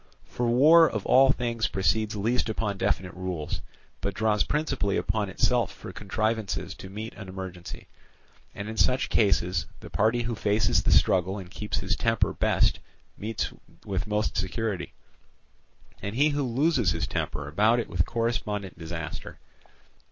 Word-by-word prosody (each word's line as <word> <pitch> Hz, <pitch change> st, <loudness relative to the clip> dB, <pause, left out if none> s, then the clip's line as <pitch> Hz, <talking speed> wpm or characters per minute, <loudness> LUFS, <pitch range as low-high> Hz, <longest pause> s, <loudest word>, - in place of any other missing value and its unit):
For 120 Hz, -, -2 dB
war 155 Hz, +7 st, +7 dB
of 110 Hz, -3 st, -4 dB
all 135 Hz, +1 st, +6 dB
things 115 Hz, -5 st, -1 dB
proceeds 105 Hz, +4 st, 0 dB
least 115 Hz, +4 st, 0 dB
upon 105 Hz, -3 st, -2 dB
definite 95 Hz, -2 st, 0 dB
rules, 90 Hz, -5 st, -4 dB, 0.4 s
but 100 Hz, -1 st, -2 dB
draws 105 Hz, -1 st, +2 dB
principally 135 Hz, -10 st, 0 dB
upon 105 Hz, -3 st, -1 dB
itself 120 Hz, +5 st, +1 dB
for -, -, -10 dB
contrivances 110 Hz, +1 st, -2 dB
to 95 Hz, -, -10 dB
meet 110 Hz, +3 st, -6 dB
an 100 Hz, -3 st, -9 dB
emergency; 95 Hz, -2 st, -7 dB, 0.7 s
and 100 Hz, -, -5 dB
in 110 Hz, 0 st, -6 dB
such 130 Hz, +6 st, +2 dB
cases 90 Hz, -5 st, +2 dB
the -, -, -11 dB
party 110 Hz, +3 st, +2 dB
who 115 Hz, 0 st, -2 dB
faces 105 Hz, -2 st, +2 dB
the -, -, +1 dB
struggle 95 Hz, +1 st, +3 dB
and 95 Hz, -2 st, -9 dB
keeps 105 Hz, +1 st, -3 dB
his 100 Hz, +3 st, 0 dB
temper 115 Hz, -1 st, +1 dB
best -, -, +2 dB, 0.4 s
meets 110 Hz, +1 st, -3 dB, 0.3 s
with -, -, -2 dB
most 105 Hz, +1 st, 0 dB
security, 95 Hz, +1 st, -2 dB, 1.1 s
and 100 Hz, +2 st, -4 dB
he 145 Hz, +4 st, +4 dB
who 145 Hz, 0 st, -1 dB
loses 130 Hz, -, +2 dB
his 85 Hz, -, -1 dB
temper 70 Hz, -1 st, -3 dB
about 105 Hz, +10 st, +3 dB
it 115 Hz, -, -2 dB
with 90 Hz, -4 st, +1 dB
correspondent 105 Hz, -5 st, -2 dB
disaster. 80 Hz, 0 st, -6 dB
105 Hz, 150 wpm, -27 LUFS, 95-115 Hz, 1.1 s, war